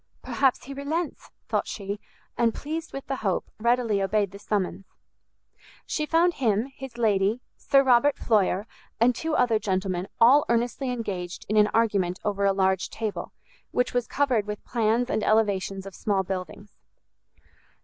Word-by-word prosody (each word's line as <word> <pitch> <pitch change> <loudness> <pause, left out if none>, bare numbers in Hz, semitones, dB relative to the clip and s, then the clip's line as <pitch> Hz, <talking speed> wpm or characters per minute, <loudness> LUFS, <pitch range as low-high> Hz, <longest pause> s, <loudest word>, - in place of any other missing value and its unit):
"Perhaps 265 -2 +1
he 275 - -8
relents!" 300 +4 -3 0.2
thought - - 0
she; 200 0 -5 0.4
and 230 -1 +1
pleased 320 +3 -5
with 275 - -6
the 270 - -3
hope, 195 -6 -2
readily 235 -3 +2
obeyed 200 0 +1
the 200 - -10
summons. 195 -2 -2 1.0
She 305 -1 -2
found 340 +2 +3
him, 235 -1 0
his 265 -3 -9
lady, 215 +1 +1
Sir 275 0 +3
Robert 265 +2 +4
Floyer, 205 -3 +1 0.3
and 240 +2 +4
two 320 +4 -2
other 230 -6 +3
gentlemen, 190 -2 -1
all 270 +6 +7
earnestly 240 +3 0
engaged 195 -8 -4
in 215 - -1
an 210 0 +6
argument 200 -5 +1
over 200 -1 0
a 195 - +4
large 190 -1 +1
table, 220 -2 -4 0.4
which 250 - 0
was 245 -1 0
covered 250 -7 +1
with 210 0 -6
plans 230 +1 +1
and 220 - -1
elevations 200 -3 +1
of 195 - -8
small 195 -1 0
buildings. 190 +2 -6
220 Hz, 155 wpm, -26 LUFS, 195-250 Hz, 1.0 s, all